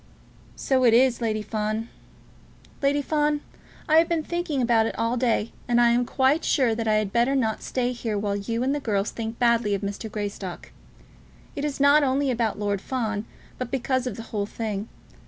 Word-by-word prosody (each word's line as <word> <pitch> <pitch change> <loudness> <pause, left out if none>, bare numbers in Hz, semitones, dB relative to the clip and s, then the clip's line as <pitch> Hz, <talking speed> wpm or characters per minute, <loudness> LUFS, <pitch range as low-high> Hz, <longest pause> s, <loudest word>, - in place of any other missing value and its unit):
"So 260 -1 +1
it 230 -2 +6
is, 250 0 +4
Lady 215 -2 -1
Fawn. 215 +1 -2 0.9
Lady 285 +1 +2
Fawn, 295 0 +1 0.5
I 315 - +5
have 330 +1 +4
been 330 -2 0
thinking 345 -4 -2
about 230 -2 +3
it - - -5
all 230 0 0
the 250 - -1
day, 225 -1 0 0.2
and 240 0 +3
I 240 -1 +5
am 245 +1 +2
quite 270 +4 +2
sure 255 -6 +2
that 225 0 -3
I 215 - +3
had 215 -2 0
better 240 +4 +2
not 220 -5 0
stay 250 -1 -1
here 230 -3 -3
while 200 0 -1
you 230 +4 -2
and 270 +2 +1
the 290 - -1
girls 205 -6 -1
think 225 0 -5
badly 235 -4 +2
of 200 - -5
Mr. 205 +2 -4
Greystock. 200 -3 -5 0.8
It 285 - -4
is 295 -2 -2
not 285 +2 +6
only 275 0 +1
about 230 -3 -1
Lord 205 -2 -1
Fawn, 220 -4 -2 0.3
but 255 -2 -3
because 260 0 -1
of 235 - -4
the 225 - -6
whole 205 -1 -1
thing. 215 -1 -4
235 Hz, 200 wpm, -25 LUFS, 215-265 Hz, 0.9 s, it